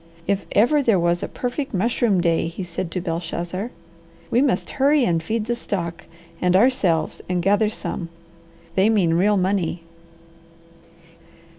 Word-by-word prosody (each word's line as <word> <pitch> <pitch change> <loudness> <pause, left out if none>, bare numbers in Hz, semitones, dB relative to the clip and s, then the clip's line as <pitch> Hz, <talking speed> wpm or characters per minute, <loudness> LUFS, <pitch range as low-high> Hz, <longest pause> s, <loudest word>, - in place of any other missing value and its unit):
"If 200 0 -1
ever 265 +8 +4
there 225 -8 +3
was 175 0 +1
a - - -3
perfect 250 0 -4
mushroom 210 -1 +2
day!" 165 -1 +1
he 170 +3 -6
said 175 0 -4
to 180 +1 -3
Belshazzar. 175 +4 -4 0.6
"We 240 - +4
must 275 -3 0
hurry 285 -1 +4
and 165 -4 +1
feed 215 +6 -2
the 240 - -1
stock 170 -8 -4 0.4
and 180 0 +3
ourselves 190 -8 +2
and 180 -1 0
gather 205 +3 +3
some. 175 -5 -5 0.6
They 190 +4 +3
mean 190 -7 +3
real 200 +5 +3
money." 180 -3 0
190 Hz, 145 wpm, -22 LUFS, 170-225 Hz, 0.6 s, ever